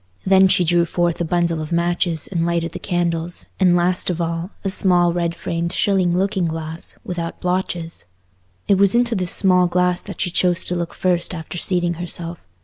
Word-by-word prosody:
Then 190 0 +6
she 185 -1 +3
drew 170 0 +3
forth 175 0 -1
a - - +2
bundle 170 -1 0
of 155 - -6
matches 170 -1 0
and 170 -3 -2
lighted 170 -1 -1
the - - -7
candles; 175 -2 -2
and 180 -2 +4
last 180 +1 +1
of 175 -1 -2
all, 170 +1 -2
a 195 - -1
small 175 -3 +3
red 170 -1 -1
framed 170 0 -3
shilling 185 -4 +1
looking 190 -1 0
glass, 160 0 -5
without 170 -2 -5
blotches. 180 -2 -3 0.6
It 195 -2 +3
was 200 +2 +4
into 240 0 +2
this 185 -3 -1
small 180 -2 +4
glass 180 0 +1
that 200 - -9
she 180 - 0
chose 180 0 +1
to 180 - 0
look 170 -1 -4
first 180 0 0
after 165 +1 -6
seating 175 -1 +1
herself. 170 -1 -2
175 Hz, 190 wpm, -20 LUFS, 170-185 Hz, 0.6 s, Then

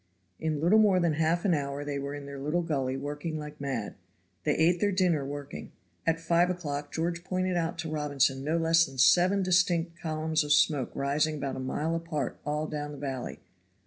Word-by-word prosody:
In 155 -2 -1
little 175 +8 +5
more 200 -4 +5
than 170 -3 +2
half 160 +4 +1
an 190 - +4
hour 140 -1 -2
they 145 -1 -3
were 140 +1 -4
in 145 -1 -8
their 140 0 -7
little 150 +5 0
gully 135 -5 -1
working 145 +3 -4
like 150 -1 -8
mad. 130 -7 -3 0.5
They 150 - +2
ate 170 +2 +3
their 205 +2 +2
dinner 180 -6 +2
working. 145 0 -7 0.3
At 165 0 +2
five 170 +2 +2
o'clock 145 -5 -4
George 170 +1 -2
pointed 185 0 -1
out 170 0 -1
to 165 -1 -4
Robinson 145 -3 0
no 155 +3 0
less 165 0 +4
than 135 -1 -12
seven 185 +8 +5
distinct 175 -2 +2
columns 155 -1 0
of 145 0 +2
smoke 145 -3 +3
rising 145 +3 +1
about 140 -2 -3
a - - -4
mile 150 +5 -2
apart 165 -5 -3
all 150 +1 -1
down 150 -1 -4
the - - -8
valley. 135 -3 -5
155 Hz, 200 wpm, -29 LUFS, 145-170 Hz, 0.5 s, little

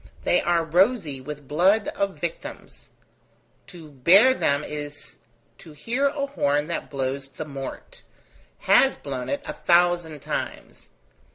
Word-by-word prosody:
They 175 - +2
are 170 -1 +1
rosy 175 - +1
with 145 0 -8
blood 190 +9 +2
of 200 -1 -2
victims. - - -7 0.8
To 165 -5 -13
bear 185 - +6
them 145 - 0
is 145 -1 -7 0.4
to 160 - -13
hear 245 - -1
a 280 0 -2
horn 145 - 0
that 170 +1 -4
blows 135 0 -3
the 155 - -7
mort: 140 - -8 0.6
has 270 - +4
blown 130 -3 -5
it 285 0 -2
a 300 - -4
thousand 175 - +2
times. - - -6
165 Hz, 130 wpm, -24 LUFS, 145-200 Hz, 0.8 s, bear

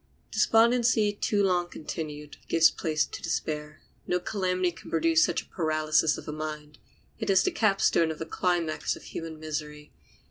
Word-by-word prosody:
Despondency 230 -2 +3
too 205 0 0
long 180 -2 +1
continued 150 -2 -7
gives 165 -1 +5
place 155 -3 0
to - - -9
despair. 150 0 -3 0.3
No 180 - +1
calamity 185 -1 -1
can 170 - -13
produce 165 0 +3
such - - 0
a - - -27
paralysis 155 -2 +1
of - - -9
the - - -5
mind. 150 -1 -6 0.4
It 220 -2 -3
is 195 0 +5
the - - +1
capstone 195 -6 +2
of 160 - -4
the 160 - -5
climax 170 -2 -1
of - - -13
human 165 -1 -7
misery. 150 -1 -6
165 Hz, 165 wpm, -27 LUFS, 155-185 Hz, 0.4 s, gives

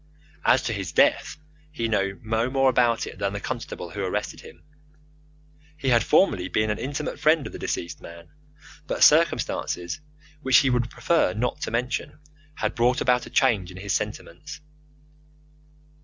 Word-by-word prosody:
As 130 - +4
to 115 - -2
his 95 -5 -4
death, - - +2 0.3
he 115 -6 -2
knew 100 -3 -1
no 115 +2 0
more 135 0 +3
about 120 -2 +2
it - - -10
than 100 0 -1
the 105 - -3
constable 85 -3 -6
who 100 +1 -4
arrested 105 +3 -3
him. - - -15 1.1
He 135 - -1
had 120 -2 +4
formerly 95 - +3
been 110 +2 0
an 105 - -3
intimate 145 +5 -4
friend 155 -1 +3
of - - -7
the - - -7
deceased 85 - -4
man; 85 0 -12 0.6
but - - +1
circumstances, 150 - +2 0.4
which 130 -3 +5
he 135 -3 +4
would 120 -1 0
prefer 165 - +1
not 120 +2 -2
to - - -2
mention, 125 +3 -3 0.4
had 110 0 -2
brought 120 +2 +2
about 125 -1 +1
a - - -10
change 95 -6 +2
in 90 - -11
his 100 +1 -3
sentiments. 150 - -5
115 Hz, 165 wpm, -25 LUFS, 100-130 Hz, 1.1 s, which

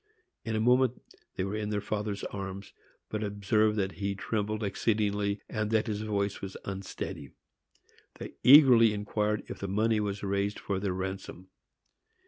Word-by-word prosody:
In 110 -2 -2
a - - +1
moment 125 +2 +3 0.4
they 95 - -1
were 95 +2 -3
in 105 -1 -2
their 105 -1 0
father's 105 -1 -3
arms, 100 0 -6 0.4
but 110 0 -3
observed 105 +1 +1
that 95 -2 0
he 100 0 -1
trembled 110 +1 -2
exceedingly, 105 0 0
and 105 -1 -2
that 110 -1 +2
his 105 -1 -3
voice 100 -2 -2
was 95 -1 -6
unsteady. 95 -7 -6 0.9
They - - -8
eagerly 125 -5 +8
inquired 105 0 -1
if - - -8
the 100 - -4
money 110 +3 +1
was 100 -1 -3
raised 100 +1 -1
for 100 -2 -3
their 95 -2 -1
ransom. 95 0 -6
105 Hz, 155 wpm, -29 LUFS, 100-110 Hz, 0.9 s, eagerly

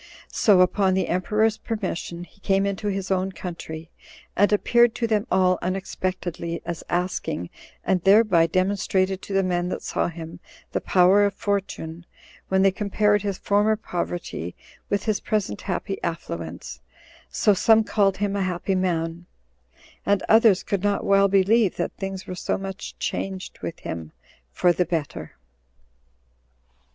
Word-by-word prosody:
So, 200 -5 +4
upon 185 +1 +3
the 190 -2 0
emperor's 210 +4 +1
permission, 180 -5 -4
he 175 - -17
came 195 0 +1
into 200 +1 -2
his 195 -1 -2
own 190 0 +1
country, 165 -3 -7 0.4
and 205 +2 +4
appeared 235 +3 +4
to 235 - -1
them 215 -1 0
all 185 -1 +3
unexpectedly 180 -2 -3
as 170 -1 -5
asking, 175 - -2 0.3
and 185 -1 +1
thereby 195 -3 +5
demonstrated 185 +1 0
to 200 - -7
the 195 0 +3
men 180 -1 0
that - - -4
saw - - -1
him 165 -1 -8 0.3
the - - -1
power 185 +2 +5
of 200 -1 +1
fortune, 190 -6 -3 0.4
when 190 0 +2
they 195 - +5
compared 205 +1 +1
his 200 -2 -2
former 205 +2 +2
poverty 175 - -4 0.3
with 200 - 0
his 215 -2 0
present 205 - -2
happy 195 +1 -3
affluence; 85 - -5 0.5
so 210 - +3
some 220 +3 +4
called 200 -3 +1
him 205 0 -1
a 200 - 0
happy 185 +1 -1
man, 175 -2 -1 0.8
and 200 -1 +1
others 220 -4 +5
could 200 -3 -1
not 205 0 0
well 195 0 +5
believe 200 +2 +3
that - - -2
things 195 -1 -5
were - - -6
so 180 - -2
much 195 0 -7
changed 190 -1 -4
with 170 - -5
him 80 -1 -6 0.4
for 175 - +3
the 180 - +2
better. 160 -3 -4
190 Hz, 150 wpm, -24 LUFS, 175-205 Hz, 0.8 s, thereby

